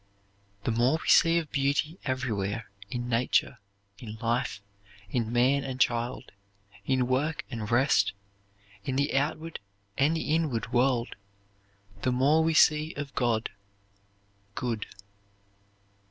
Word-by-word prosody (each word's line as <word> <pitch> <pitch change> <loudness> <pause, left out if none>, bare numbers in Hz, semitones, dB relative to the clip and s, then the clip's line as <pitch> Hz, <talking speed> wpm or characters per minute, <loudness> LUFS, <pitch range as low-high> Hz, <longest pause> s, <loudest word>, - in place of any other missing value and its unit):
"The - - 0
more 120 +7 +2
we - - -9
see 165 0 +6
of 160 -3 -2
beauty 145 +5 0
everywhere; 115 -6 -2 0.2
in 120 +2 -4
nature, 120 0 +1 0.4
in 110 -3 -8
life, 115 -1 -1 0.5
in 115 -3 -1
man 130 +4 +3
and 130 -2 -5
child, 120 0 0 0.6
in 130 -1 +2
work 140 +5 -1
and 110 -4 -4
rest, 120 -4 +3 0.7
in 130 - -2
the 140 +2 0
outward 155 +3 -1 0.4
and 150 +4 +3
the 155 - -1
inward 155 -8 -1
world, 120 -1 +1 0.9
the 130 - +1
more 140 +6 +3
we 160 0 +1
see 155 +1 +4
of 140 -1 -6
God 115 -3 0 1.0
(good)." 115 -4 -3
130 Hz, 125 wpm, -28 LUFS, 120-145 Hz, 1.0 s, see